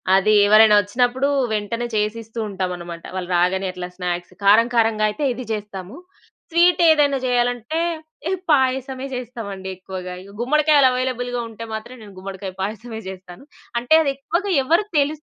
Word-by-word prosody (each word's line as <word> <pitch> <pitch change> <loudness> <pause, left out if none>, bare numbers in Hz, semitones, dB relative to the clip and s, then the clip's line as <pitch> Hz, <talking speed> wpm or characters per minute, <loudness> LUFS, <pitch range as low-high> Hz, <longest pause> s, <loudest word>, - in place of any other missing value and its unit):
అది 205 +3 +3
ఎవరైనా 215 0 +7
ఒచ్చినప్పుడూ 245 +6 +1 0.2
వెంటనే 225 +3 -2
చేసిస్తూ 220 +2 -2
ఉంటామనమాట, 180 -3 -5
వాళ్ళు 185 -1 -4
రాగానే 185 +2 +1
అట్లా 180 -1 -6
స్నాక్స్. 175 -1 -4
కారం 215 +4 +5
కారంగా 220 -2 +3
అయితే 250 +8 -5
ఇది 255 - -7
జేస్తాము, 205 - -7 0.5
స్వీటేదైనా 325 -4 +4
జెయ్యాలంటే, 245 +4 0 0.5
ఇహ 380 - 0
పాయసమే 265 -1 +1
చేస్తామండి 225 -6 -6
ఎక్కువగా. 185 -1 -7
ఇవి 200 +1 -14
గుమ్మడికాయలు 295 +2 +4
అవైలబుల్‌గా 245 -1 -2
ఉంటే 225 +1 -8
మాత్రం 220 +3 -6
నేను 200 -2 -13
గుమ్మడికాయ 190 0 -7
పాయసమే 220 +3 -5
జేస్తాను. 185 +2 -11 0.4
అంటే, 245 +6 +1
అది 280 - +1
ఎక్కువగా 345 +8 -2
ఎవ్వరు 335 +9 +2
తెలుస్ 300 +2 -1
225 Hz, 135 wpm, -21 LUFS, 195-260 Hz, 0.5 s, ఎవరైనా